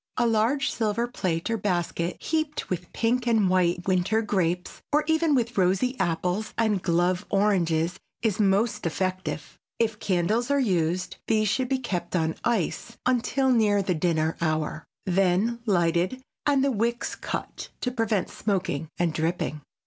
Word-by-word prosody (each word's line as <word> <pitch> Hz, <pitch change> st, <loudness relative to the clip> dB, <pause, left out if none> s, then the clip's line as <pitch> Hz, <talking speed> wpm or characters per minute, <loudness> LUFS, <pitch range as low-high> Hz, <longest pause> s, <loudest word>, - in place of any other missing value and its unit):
A 240 Hz, -, +3 dB
large 230 Hz, +5 st, +2 dB
silver 225 Hz, +1 st, 0 dB
plate 180 Hz, -9 st, -2 dB
or 225 Hz, -, +1 dB
basket 175 Hz, -3 st, -1 dB
heaped 310 Hz, -7 st, -2 dB
with 180 Hz, -1 st, -3 dB
pink 240 Hz, +2 st, 0 dB
and 220 Hz, -4 st, +3 dB
white 180 Hz, -1 st, +1 dB
winter 190 Hz, +4 st, +2 dB
grapes 180 Hz, -4 st, -1 dB
or 300 Hz, +1 st, +3 dB
even 320 Hz, -1 st, +2 dB
with 235 Hz, -4 st, 0 dB
rosy 190 Hz, +8 st, +2 dB
apples 180 Hz, +4 st, -1 dB
and 215 Hz, -4 st, +2 dB
"glove" 175 Hz, +1 st, +1 dB
oranges 180 Hz, -5 st, +1 dB, 0.2 s
is 220 Hz, -4 st, +1 dB
most 210 Hz, 0 st, +2 dB
effective. 175 Hz, -3 st, -3 dB, 0.2 s
If 220 Hz, -2 st, 0 dB
candles 205 Hz, +6 st, +1 dB
are 280 Hz, 0 st, +3 dB
used 180 Hz, -4 st, 0 dB
these 215 Hz, -2 st, +2 dB
should 255 Hz, +4 st, 0 dB
be 265 Hz, -, +2 dB
kept 195 Hz, -9 st, -3 dB
on 160 Hz, -2 st, +1 dB
ice 230 Hz, 0 st, -1 dB
until 255 Hz, +2 st, +2 dB
near 210 Hz, -4 st, +3 dB
the 185 Hz, -, +1 dB
dinner 160 Hz, -1 st, 0 dB
hour, 155 Hz, -1 st, -1 dB, 0.2 s
then 195 Hz, +5 st, +2 dB
lighted 180 Hz, +6 st, +1 dB, 0.2 s
and 280 Hz, -2 st, +3 dB
the 275 Hz, -, +2 dB
wicks 235 Hz, +1 st, -1 dB
cut, -, -, -5 dB
to 250 Hz, -, -1 dB
prevent 225 Hz, -5 st, 0 dB
smoking 180 Hz, -7 st, -2 dB
and 170 Hz, -2 st, +1 dB
dripping. 160 Hz, -1 st, -1 dB
195 Hz, 150 wpm, -26 LUFS, 175-235 Hz, 0.2 s, A